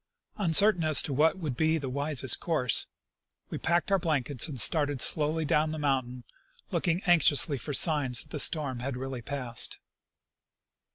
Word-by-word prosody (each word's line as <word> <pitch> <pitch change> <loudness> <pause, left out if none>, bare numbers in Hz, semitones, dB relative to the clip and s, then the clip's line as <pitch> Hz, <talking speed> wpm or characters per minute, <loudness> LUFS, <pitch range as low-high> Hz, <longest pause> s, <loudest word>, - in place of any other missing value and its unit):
Uncer 200 +3 +3
tain 175 - -6
as 155 -2 +4
to 140 - -5
what 155 +6 +1
would 155 -8 -5
be 160 +3 0
the 140 -4 -6
wisest 140 0 +1
course, 140 -9 +2 0.6
we - - -6
packed 175 +3 -1
our 195 - +2
blankets 145 -5 -1
and 140 -5 -8
started 145 0 +2
slowly 155 +4 +2
down 150 +2 0
the 155 - -6
mountain, 130 -4 -3 0.5
looking 175 +2 -2
anx 175 -4 +3
iously 145 -2 +1
for 150 - -4
signs 145 -5 +1
that - - -25
the 150 - -5
storm 140 -5 +2
had 130 +1 -6
really 130 -1 -7
passed. 125 -3 -1
150 Hz, 170 wpm, -27 LUFS, 130-160 Hz, 0.6 s, as